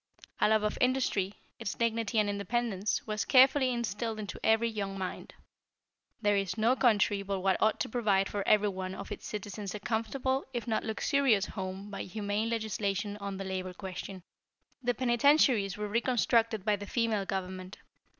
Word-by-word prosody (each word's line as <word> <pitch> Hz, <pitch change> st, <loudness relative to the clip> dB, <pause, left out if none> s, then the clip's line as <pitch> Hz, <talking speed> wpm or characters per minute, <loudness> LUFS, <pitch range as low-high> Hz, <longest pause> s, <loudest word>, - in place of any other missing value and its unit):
A -, -, +4 dB
love 215 Hz, -1 st, +3 dB
of 210 Hz, -, -1 dB
industry, 250 Hz, -7 st, +1 dB, 0.2 s
its 225 Hz, -3 st, -3 dB
dignity 230 Hz, -2 st, 0 dB
and 210 Hz, -1 st, +4 dB
independence, 205 Hz, 0 st, -1 dB
was 215 Hz, -1 st, -1 dB
carefully 265 Hz, 0 st, +5 dB
instilled 230 Hz, -1 st, -2 dB
into 205 Hz, -3 st, -6 dB
every 220 Hz, +1 st, +4 dB
young 200 Hz, -3 st, -3 dB
mind. 185 Hz, -1 st, -6 dB, 0.9 s
There 205 Hz, 0 st, +4 dB
is 195 Hz, 0 st, -1 dB
no 230 Hz, +4 st, +3 dB
country 210 Hz, -5 st, +3 dB
but 195 Hz, -1 st, -3 dB
what 190 Hz, 0 st, +1 dB
ought 215 Hz, 0 st, +3 dB
to -, -, 0 dB
provide 205 Hz, -5 st, +2 dB
for 205 Hz, -, -3 dB
everyone 190 Hz, -3 st, +2 dB
of 200 Hz, -, -8 dB
its -, -, -6 dB
citizens 205 Hz, -1 st, -5 dB
a -, -, -4 dB
comfortable, 250 Hz, +5 st, -1 dB
if 235 Hz, -3 st, -2 dB
not 220 Hz, -2 st, 0 dB
luxurious, 225 Hz, -1 st, +2 dB
home 190 Hz, 0 st, -6 dB
by -, -, -5 dB
humane 205 Hz, +3 st, -2 dB
legislation 210 Hz, -2 st, -2 dB
on 200 Hz, -1 st, -5 dB
the 195 Hz, -, -5 dB
labor 185 Hz, -1 st, -4 dB
question. 190 Hz, -1 st, -7 dB, 0.6 s
"The 245 Hz, -1 st, 0 dB
penitentiaries 240 Hz, -4 st, +3 dB
were 210 Hz, 0 st, -3 dB
reconstructed 230 Hz, -2 st, +1 dB
by 210 Hz, -1 st, +2 dB
the 205 Hz, 0 st, -8 dB
female 225 Hz, -4 st, 0 dB
government. 185 Hz, 0 st, -4 dB
210 Hz, 165 wpm, -30 LUFS, 195-230 Hz, 0.9 s, carefully